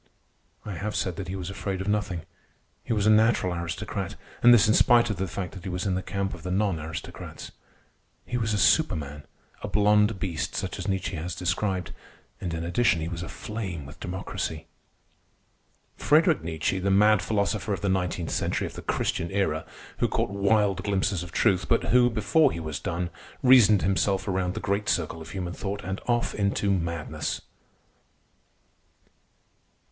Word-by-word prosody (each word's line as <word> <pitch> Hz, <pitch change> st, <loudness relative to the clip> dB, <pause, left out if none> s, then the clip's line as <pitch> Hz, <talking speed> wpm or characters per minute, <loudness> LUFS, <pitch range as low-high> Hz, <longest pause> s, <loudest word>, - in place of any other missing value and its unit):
I 105 Hz, -, -5 dB
have 100 Hz, +4 st, -4 dB
said 90 Hz, -3 st, -1 dB
that 95 Hz, -, -5 dB
he 95 Hz, -, -4 dB
was 95 Hz, 0 st, -5 dB
afraid 100 Hz, -1 st, -3 dB
of 95 Hz, -, -4 dB
nothing. 105 Hz, -5 st, -1 dB, 0.6 s
He -, -, -6 dB
was 105 Hz, -3 st, +1 dB
a -, -, +5 dB
natural 110 Hz, -4 st, +3 dB
aristocrat—and 85 Hz, +7 st, -1 dB
this 115 Hz, -3 st, +7 dB
in 110 Hz, -, +4 dB
spite 120 Hz, -1 st, +5 dB
of 100 Hz, -, -3 dB
the 95 Hz, +2 st, -1 dB
fact 90 Hz, 0 st, -5 dB
that 95 Hz, -, -9 dB
he 95 Hz, -, -5 dB
was 90 Hz, +2 st, -3 dB
in 95 Hz, -, +1 dB
the 95 Hz, -, -1 dB
camp 100 Hz, 0 st, -3 dB
of 90 Hz, -, -9 dB
the 90 Hz, -, -5 dB
non 95 Hz, -2 st, +1 dB
aristocrats. 80 Hz, +1 st, -7 dB, 0.7 s
He 125 Hz, -, -4 dB
was 110 Hz, -3 st, 0 dB
a 105 Hz, -, +1 dB
superman, 75 Hz, -6 st, +2 dB, 0.3 s
a -, -, -4 dB
blond 105 Hz, 0 st, +3 dB
beast 85 Hz, -4 st, -3 dB
such -, -, -3 dB
as -, -, -4 dB
Nietzsche 95 Hz, -2 st, -1 dB
has 85 Hz, +2 st, -4 dB
described, 90 Hz, +1 st, -1 dB, 0.5 s
and 90 Hz, -, -4 dB
in 80 Hz, 0 st, -3 dB
addition 90 Hz, +1 st, +2 dB
he 80 Hz, -, -3 dB
was 85 Hz, -1 st, -5 dB
aflame 90 Hz, -3 st, -5 dB
with 75 Hz, +4 st, -12 dB
democracy. 85 Hz, -3 st, -4 dB, 1.3 s
Friederich 160 Hz, +2 st, +4 dB
Nietzsche, 80 Hz, +3 st, -1 dB
the 95 Hz, +1 st, 0 dB
mad 105 Hz, +1 st, +5 dB
philosopher 105 Hz, 0 st, -1 dB
of 95 Hz, -4 st, -2 dB
the 100 Hz, -, -1 dB
nineteenth 90 Hz, -3 st, -1 dB
century -, -, -1 dB
of -, -, -6 dB
the -, -, -8 dB
Christian 85 Hz, -, -1 dB
Era, 95 Hz, -6 st, -1 dB, 0.3 s
who -, -, +3 dB
caught -, -, -1 dB
wild 100 Hz, -2 st, +2 dB
glimpses 100 Hz, -2 st, 0 dB
of 90 Hz, -1 st, -8 dB
truth, 90 Hz, +2 st, +2 dB
but 115 Hz, -, +3 dB
who, 125 Hz, -1 st, +6 dB
before 120 Hz, +7 st, +3 dB
he -, -, -4 dB
was 80 Hz, -3 st, -4 dB
done, 85 Hz, +1 st, -3 dB, 0.3 s
reasoned 120 Hz, -6 st, +7 dB
himself 95 Hz, 0 st, +1 dB
around 95 Hz, -1 st, -1 dB
the -, -, -2 dB
great 100 Hz, +1 st, -1 dB
circle 80 Hz, -1 st, -1 dB
of 80 Hz, -, -9 dB
human 90 Hz, +1 st, -4 dB
thought 100 Hz, +2 st, -4 dB
and 95 Hz, +2 st, -4 dB
off 120 Hz, -1 st, +1 dB
into 100 Hz, 0 st, 0 dB
madness. 85 Hz, -4 st, -2 dB
95 Hz, 175 wpm, -26 LUFS, 85-105 Hz, 1.3 s, this